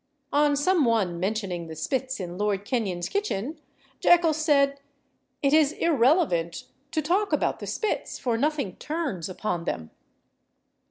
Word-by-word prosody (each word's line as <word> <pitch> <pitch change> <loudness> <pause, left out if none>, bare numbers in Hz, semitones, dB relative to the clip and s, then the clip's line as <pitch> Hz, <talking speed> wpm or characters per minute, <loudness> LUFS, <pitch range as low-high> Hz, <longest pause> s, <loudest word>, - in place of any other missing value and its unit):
On 290 0 +4
some 320 +3 +3
one 205 -8 +1
mentioning 190 -3 -2
the 160 - -8
spits 260 - -2
in 175 -2 -5
Lord 205 0 -1
Kenyon's 200 -8 -1
kitchen, 315 - -2 0.4
Jekyll 340 -2 +5
said, 280 -3 +2 0.6
"It 280 +1 +3
is 310 -1 +5
irrelevant 260 - +2 0.3
to 310 -2 0
talk 390 +7 +1
about - - +1
the - - -7
spits, 435 - -2
for 240 -3 -1
nothing 280 - -1
turns 290 - -3
upon 180 -3 -3
them." 80 -1 -4
265 Hz, 140 wpm, -26 LUFS, 190-310 Hz, 0.6 s, Jekyll